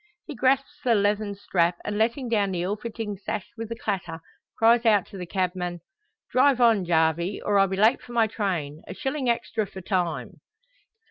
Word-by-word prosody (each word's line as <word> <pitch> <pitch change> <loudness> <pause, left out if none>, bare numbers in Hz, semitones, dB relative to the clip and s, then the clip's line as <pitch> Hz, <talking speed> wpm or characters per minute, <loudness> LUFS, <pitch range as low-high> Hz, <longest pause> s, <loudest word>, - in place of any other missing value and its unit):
He 305 - -7
grasps 275 +2 +1
the 240 -2 +3
leathern 205 0 +1
strap, 175 -3 0
and 210 - -2
letting 235 +4 0
down 210 -4 +1
the 175 -1 -1
ill 195 +3 -1
fitting 215 -1 -5
sash 210 0 -4
with 225 -1 -6
a - - -2
clatter, 180 -7 -3 0.4
cries 230 +1 +5
out 210 -5 +4
to 200 - -9
the 180 - -6
cabman, 180 -1 -2 0.5
"Drive 260 0 +4
on, 225 -6 +4
Jarvey, 170 +3 +1
or 205 -1 +1
I'll 195 - +5
be 190 0 -3
late 220 +6 +4
for 240 - -11
my 230 -1 +4
train! 175 -9 -3
A - - -7
shilling 270 -2 -2
extra 230 -2 -1
for 190 - -9
time." 180 -2 -2
205 Hz, 190 wpm, -25 LUFS, 185-230 Hz, 0.5 s, cries